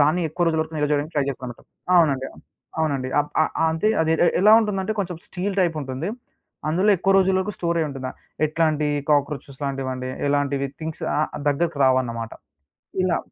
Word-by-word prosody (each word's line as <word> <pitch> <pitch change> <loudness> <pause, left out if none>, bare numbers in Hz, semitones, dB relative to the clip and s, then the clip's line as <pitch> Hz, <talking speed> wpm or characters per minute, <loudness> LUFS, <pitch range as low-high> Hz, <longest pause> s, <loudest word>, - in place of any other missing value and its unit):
దాన్ని 155 +5 +3
ఎక్కువ 175 +3 -1
రోజుల 160 -1 +2
వరకు 160 0 -10
నిలవ 150 -1 0
జేయడానికి 150 +2 0
ట్రై 145 -2 +2
జేస్తాంమాట. 125 -3 -6 0.4
అవునండి. 140 -6 +3 0.5
అవునండి. 140 -5 0
అప్ 145 - -4
ఆహ్, - - -1 0.2
అంటే 160 +7 +1
అది 160 0 +1
ఎ - - 0 0.2
ఎలా 210 +3 +7
ఉంటుందంటే, 205 -1 -1
కొంచెం 180 -3 -2
స్టీలు 190 +2 -3
టైపుంటుంది, 155 -3 -1 0.6
అందులో 185 +7 +3
ఎక్కువ 195 +3 +2
రోజులకు 190 +1 +2
స్టోరయ్యుంటుందా, 155 -7 -2 0.4
ఎట్లాంటి 155 -1 +1 0.2
కాక్రోచెస్ 145 -1 0
లాంటివండి, 130 -2 -3 0.2
ఎలాంటివి 140 -1 0
థింగ్స్ 160 -1 -6
ఆ - - +1 0.3
దగ్గరకి 150 +1 0
రావన్నమాట. 120 -3 +1 0.7
ఇలా. 185 -2 +2
155 Hz, 150 wpm, -23 LUFS, 140-170 Hz, 0.7 s, ఎలా